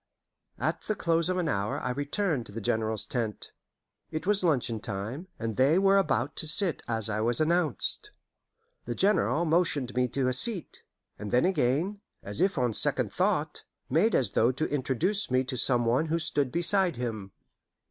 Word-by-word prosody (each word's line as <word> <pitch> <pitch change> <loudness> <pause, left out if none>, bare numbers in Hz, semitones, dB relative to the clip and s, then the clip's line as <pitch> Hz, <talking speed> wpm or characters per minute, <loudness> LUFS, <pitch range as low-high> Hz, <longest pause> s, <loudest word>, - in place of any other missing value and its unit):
At - - -2
the 215 - 0
close 165 -2 +1
of 185 - 0
an 175 -2 0
hour 100 -6 -1
I 125 - -3
returned 145 - -1
to - - -11
the 110 - -5
General's 110 0 -1
tent. 115 -4 -3 0.6
It 155 0 -5
was 200 -1 +2
luncheon 125 -9 +1
time, 110 - -5
and 115 -2 -4
they 140 +6 +4
were 195 +1 +4
about 145 - 0
to 155 - -1
sit 175 +2 +2
as 110 -3 -1
I 110 0 -2
was 120 +1 +1
announced. 170 - 0 0.8
The - - -4
General 195 -4 +2
motioned 155 -6 +1
me 125 0 +2
to 130 +1 -1
a 130 - +1
seat, 195 - 0 0.4
and 105 - -5
then 125 - +3
again, 175 +4 0 0.2
as 105 +10 -2
if 190 -2 +2
on 125 -3 +1
second - - +1
thought, - - 0 0.3
made 175 - +3
as 120 -7 +2
though 115 +4 +3
to 145 +5 -2
introduce 150 - 0
me 130 0 +2
to 130 0 -5
some 120 -1 +3
one 125 +7 +1
who 165 +2 0
stood 145 -5 -1
beside 175 0 +3
him. 110 -5 -5
140 Hz, 180 wpm, -28 LUFS, 120-175 Hz, 0.8 s, they